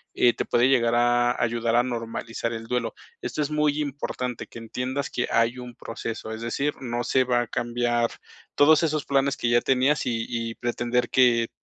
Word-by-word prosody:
eh, 120 - +4
te - - -3
puede 120 +1 +3
llegar 120 -3 +3
a 120 0 +2
ayudar 115 0 0
a 120 - +5
normalizar 115 -1 -4
el 115 0 -6
duelo. 115 -1 -2 0.3
Esto 150 - -2
es 145 - -4
muy 150 -1 +1
importante, 130 -4 -4
que - - -12
entiendas 125 +4 -4
que 125 - -1
hay 115 +2 +2
un 125 -1 -9
proceso, 115 -1 -6
es 110 0 -6
decir, 140 +5 -1
no 120 -1 -2
se 130 +2 +2
va 125 -1 +1
a 120 - -4
cambiar 120 0 0 0.5
todos 150 +1 +6
esos 155 -2 0
planes 140 0 +1
que 120 - 0
ya 120 0 +4
tenías, 135 +2 +2
y 115 -2 -1
y 115 -1 -3
pretender 120 0 -1
que, 120 -3 +3
120 Hz, 190 wpm, -25 LUFS, 115-130 Hz, 0.5 s, todos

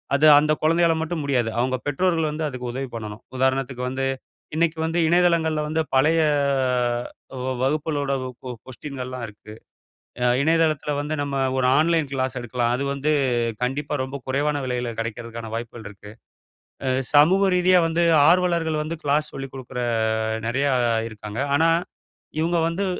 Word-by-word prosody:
அது 145 +2 +3
அந்த 155 +1 +2
குழந்தையால 165 +1 +3
மட்டும் 160 -1 -3
முடியாது. 125 -5 +1
அவங்க 130 +1 +1
பெற்றோர்கள் 165 +1 +1
வந்து 155 +1 -3
அதுக்கு 125 -2 -5
உதவி 135 0 -4
பண்ணணும். 105 -1 -7
உதாரணத்துக்கு 130 -1 0
வந்து 135 +1 -2 0.5
இன்னைக்கு 165 0 +1
வந்து 165 +2 -1
இணையதளங்கள்ல 170 -2 +2
வந்து 160 +1 0
பழைய 155 +5 +4 1.3
வ - - -3 0.2
வகுப்புகளோட 145 0 -1 0.2
ஒ - - -6
கொ 130 - -6 0.2
கொஸ்டீனல்லாம் 130 -2 -6
இருக்கு. 105 +1 -13 0.7
அ - - +3 0.2
இணையதளத்தில 155 -1 +1
வந்து 150 +1 -4
நம்ம 140 -1 -3 0.2
ஒரு 125 -1 +2
ஆன்லைன் 160 -2 +2
கிளாஸ் 130 0 -1
எடுக்கலாம். 120 0 -1
அது 130 - -2
வந்து 140 +2 0 0.5
கண்டிப்பா 140 +4 -2
ரொம்ப 130 +1 -6
குறைவான 145 +3 0
விலையில 125 -1 -2
கிடைக்கறதற்கான 115 0 -5
வாய்ப்புகள் 115 -2 -6
இருக்கு. 105 +1 -13 0.8
அ - - +1 0.3
சமூக 180 +7 +6
ரீதியா 180 0 +5
வந்து 170 +1 0 0.3
ஆர்வலர்கள் 170 -3 +2
வந்து 160 +2 -4
கிளாஸ் 150 +1 +1
சொல்லிக் 135 -1 -6
குடுக்கிற 130 -1 -6 0.7
நெறையா 140 +4 +1 0.4
இருக்காங்க. 105 +2 -6
ஆனா 165 +3 +4 0.7
இவுங்க 170 +2 +1
வந்து 175 +4 -2
140 Hz, 145 wpm, -23 LUFS, 125-160 Hz, 1.3 s, சமூக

